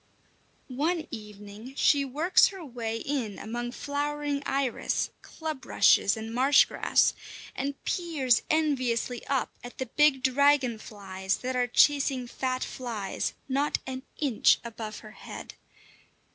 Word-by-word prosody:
One 310 +6 -1
evening 210 +2 -9
she 285 0 +4
works 300 +7 +4
her 380 -4 -8
way 230 -4 -4
in 235 -5 -3
among 240 +2 -4
flowering 290 +1 -2
iris, 270 -2 -1
club 315 -4 -6
rushes, 200 - +4
and 220 +1 -6
marsh 265 +4 +6
grass, - - +2 0.4
and 280 +1 -2
peers 300 -9 +1
enviously 255 -6 0
up 270 -2 0
at 245 - -10
the 260 - -2
big 270 +1 +3
dragon 265 -3 +3
flies 190 -3 -4
that 255 0 -1
are 250 -1 +2
chasing 275 0 +3
fat 255 +1 -2
flies 225 -6 -4
not 280 +2 +1
an 260 0 -5 0.2
inch 275 -7 +3
above 220 -2 -6
her 215 - -11
head. - - -9
260 Hz, 130 wpm, -28 LUFS, 230-285 Hz, 0.4 s, marsh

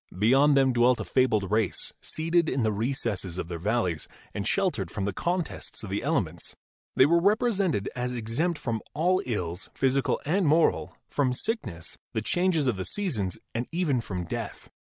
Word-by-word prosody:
Beyond 135 +8 +5
them 135 -1 +4
dwelt 120 +1 +4
a - - -2
fabled 110 -7 +2
race, 105 -6 +1
seated 165 +1 +1
in 130 -2 0
the 110 - +2
recesses 105 -5 -2
of 85 - -4
their 85 -1 -4
valleys 95 -4 0 0.3
and 100 -2 -3
sheltered 180 - 0
from 100 +1 -3
the 100 - -1
contests 175 - -3
of 100 - -6
the 100 - -1
ele 155 +6 +2
ments. 85 -2 -8 0.4
They 130 - +7
were 170 +3 +4
represented 200 - +2
as 125 0 -2
exempt 125 +10 -1
from 115 -6 -2
all 180 +5 +2
ills, 90 -6 -3
physical 135 0 +1
and 180 +3 +2
moral, 160 +3 +2
from 135 -3 +1
sickness, 125 - -3
the 110 - 0
changes 175 0 +1
of 125 -6 +1
the 95 - -3
seasons 110 - -1 0.2
and 120 +2 -2
even 160 -8 +1
from 90 -5 -4
death. - - -6
125 Hz, 175 wpm, -27 LUFS, 100-165 Hz, 0.4 s, They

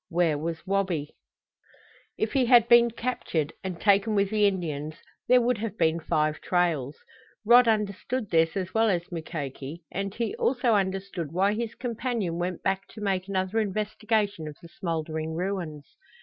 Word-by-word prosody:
Where 170 -2 +2
was 160 +2 -4
Wabi? 185 -6 -1 1.0
If 220 - -1
he 260 -3 +2
had 235 -2 +6
been 235 0 +7
captured, 225 - -2
and 185 -3 -5
taken 205 +1 +3
with 200 0 +2
the 210 -1 +4
Indians, 155 -6 -3 0.3
there 250 0 +6
would 240 -2 +1
have 220 0 -4
been 165 0 +2
five 155 -1 0
trails. 160 -6 0 0.5
Rod 240 +2 +7
understood 215 +2 -1
this 165 +1 +3
as 185 -1 -3
well 225 0 +3
as 175 -2 -1
Mukoki, 155 -1 -6
and 195 +1 -3
he 230 -3 -2
also 245 -2 +2
understood 190 -5 -1
why 195 +4 +2
his 230 +1 -3
companion 230 -8 -2
went 175 0 -3
back 195 0 -1
to - - -8
make 195 -2 -1
another 190 +2 0
investigation 210 -3 -1
of 150 - -7
the 170 - -11
smoldering 160 -3 -3
ruins. 170 -5 -3
190 Hz, 160 wpm, -27 LUFS, 165-215 Hz, 1.0 s, been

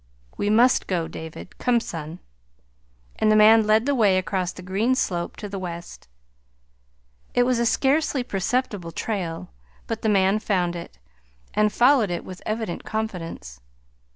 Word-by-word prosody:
"We 205 - -1
must 240 +4 +4
go, 170 -4 -1
David. 155 - -9
Come, 245 -2 +2
son." 165 -6 -7 1.0
And 215 - +3
the - - +5
man 215 +1 +6
led 215 +2 +4
the 285 - +1
way 210 -7 +3
across 185 -1 -1
the 185 - -11
green 205 +8 +1
slope 175 -8 -2
to 210 - -6
the 195 -1 -5
west. 170 - -8 1.3
It 245 - +5
was 250 -1 +1
a 235 - +2
scarcely 275 +1 +1
perceptible 205 -4 -2
trail, 170 - -4 0.3
but - - -4
the 220 - +1
man 195 0 +3
found 180 -5 0
it, 170 - -9 0.6
and 210 0 +2
followed 245 -1 +4
it 175 - -4
with 185 -1 -9
evident 215 -4 -3
confidence. 180 - -5
205 Hz, 155 wpm, -24 LUFS, 175-225 Hz, 1.3 s, man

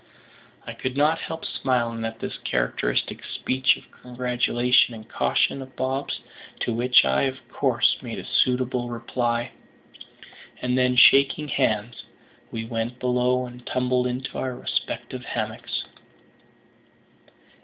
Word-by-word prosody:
I - - -6
could 130 +1 -4
not 155 +3 +3
help 160 0 -6
smiling 120 -3 -1
at 115 0 -4
this - - -5
characteristic - - -1
speech 130 0 +1
of - - -14 0.2
congratulation 125 -1 +2
and 110 0 -11
caution 135 - +1
of 130 -1 -11
Bob's, 135 +2 -2 0.4
to 120 - 0
which 125 +2 +5
I - - +2
of 130 -1 -2
course - - +2
made - - -6
a - - -7
suitable 125 -1 +1
reply; 120 0 -1 1.1
and 125 0 0
then, 125 0 +3
shaking 140 +3 +6
hands, 120 -3 0 0.5
we 115 0 -4
went 115 +1 -3
below 125 0 +1
and 125 0 -11
tumbled 125 0 +1
into 125 +2 -4
our 130 -1 -2
respective 125 - -4
hammocks. - - -3
125 Hz, 125 wpm, -25 LUFS, 120-130 Hz, 1.1 s, shaking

